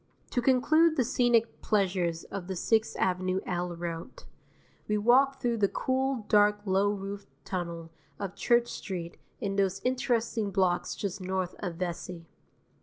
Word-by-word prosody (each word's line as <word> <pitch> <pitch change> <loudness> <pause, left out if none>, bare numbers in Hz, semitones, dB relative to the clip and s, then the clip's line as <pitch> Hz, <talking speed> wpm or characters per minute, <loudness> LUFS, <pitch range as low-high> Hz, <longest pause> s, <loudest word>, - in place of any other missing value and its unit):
To 245 - +1
conclude 310 +6 +4
the 260 - +3
scenic 235 -1 +2
pleasures 180 -5 0
of 195 -3 -7
the 190 - -3
Sixth 220 +5 +1
Avenue 185 0 +1
L 175 -1 -2
route, 170 -1 -6 0.6
we 210 - +1
walk 265 +5 +4
through 240 -2 0
the 205 -2 +3
cool, 260 0 -1
dark, 210 0 +4
low 195 +1 +2
roofed 200 0 -5 0.2
tunnel 170 -3 -4 0.3
of 195 -2 -4
Church 240 0 +2
Street 175 -4 -5 0.2
in 200 -4 -2
those 195 -1 +1
interesting 235 -4 0
blocks 185 -2 +1
just 200 -1 -4
north 185 -1 -2
of 180 -4 -4
Vesey. 175 -1 -5
200 Hz, 145 wpm, -29 LUFS, 180-235 Hz, 0.6 s, conclude